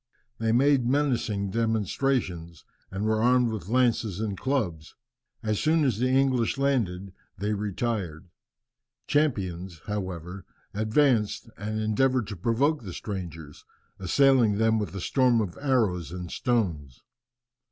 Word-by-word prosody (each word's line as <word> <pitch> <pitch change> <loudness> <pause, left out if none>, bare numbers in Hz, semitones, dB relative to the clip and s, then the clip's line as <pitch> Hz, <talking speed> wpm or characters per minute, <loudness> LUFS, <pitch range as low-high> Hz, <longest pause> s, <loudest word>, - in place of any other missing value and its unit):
They 115 0 +1
made 130 +1 +3
menacing 120 -8 0
demonstrations, 110 - -1 0.2
and 95 +2 -3
were 110 0 +1
armed 125 0 +3
with 100 -6 -5
lances 115 -5 +1
and 105 -3 -2
clubs. 95 - -2 0.5
As 110 -2 0
soon 155 0 +2
as 120 -6 0
the 125 +1 +2
English 130 -2 +2
landed 100 -10 -1 0.2
they 105 +3 -1
retired. 100 -5 -3 0.8
Champions, 95 - -1
however, 95 -3 -5 0.3
advanced, 110 0 +1
and 110 +2 -4
endeavoured 120 +3 +1
to 105 - -5
provoke 120 - +1
the 95 -6 -8
strangers, 85 -8 -7 0.4
assailing 120 +2 +3
them 110 0 +2
with 105 -2 -4
a 95 - -4
storm 125 +2 +3
of 100 -5 -2
arrows 110 - +1
and 90 -1 -6
stones. 85 - -2
110 Hz, 125 wpm, -27 LUFS, 95-125 Hz, 0.8 s, made